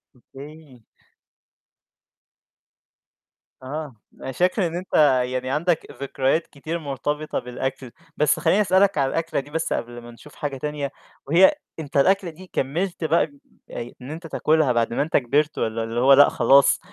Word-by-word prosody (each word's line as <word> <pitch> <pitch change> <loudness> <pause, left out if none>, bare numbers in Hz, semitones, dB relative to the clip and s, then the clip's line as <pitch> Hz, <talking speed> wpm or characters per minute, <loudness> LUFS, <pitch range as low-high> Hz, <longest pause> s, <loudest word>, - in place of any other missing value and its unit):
أوكي. 140 +2 -14 2.8
آه. 145 0 -6 0.3
أنا - - -5
فاكر 180 - +1
إن 165 - -6
أنت 180 +2 -7 0.3
يعني 130 0 -3
عندك 160 +4 0 0.2
ذكريات 140 +3 0
كتير 160 +4 -6
مرتبطة 150 +1 -3
بالأكل، 130 +1 -5 0.3
بس 150 +1 +2
خلّيني 170 +5 +3
أسألك 190 -1 +3
عن 135 -2 +2
الأكلة 165 0 -2
دي 140 +2 -9
بس 160 +1 -1
قبل 120 0 -5
ما 120 0 -12
نشوف 145 +5 -16
حاجة 140 -2 -4
تانية، 145 0 -4 0.4
وهي 180 - +5 0.2
أنت 145 -2 -4
الأكلة 190 +5 +3
دي 180 +3 -13
كمّلت 170 +7 -2
بقى 160 +2 +3 0.5
آآ 120 +1 -6
إن 130 +3 -8
أنت 165 +2 -8
تاكلها 155 -2 +2
بعد 115 -1 0
ما - - 0
أنت 150 +3 +1
كِبِرت 145 +4 0
والّا 115 0 -2
اللي 115 +1 -3
هو 135 +3 +6
لأ 145 +1 +7
خلاص 140 0 +4
145 Hz, 150 wpm, -23 LUFS, 130-165 Hz, 2.8 s, لأ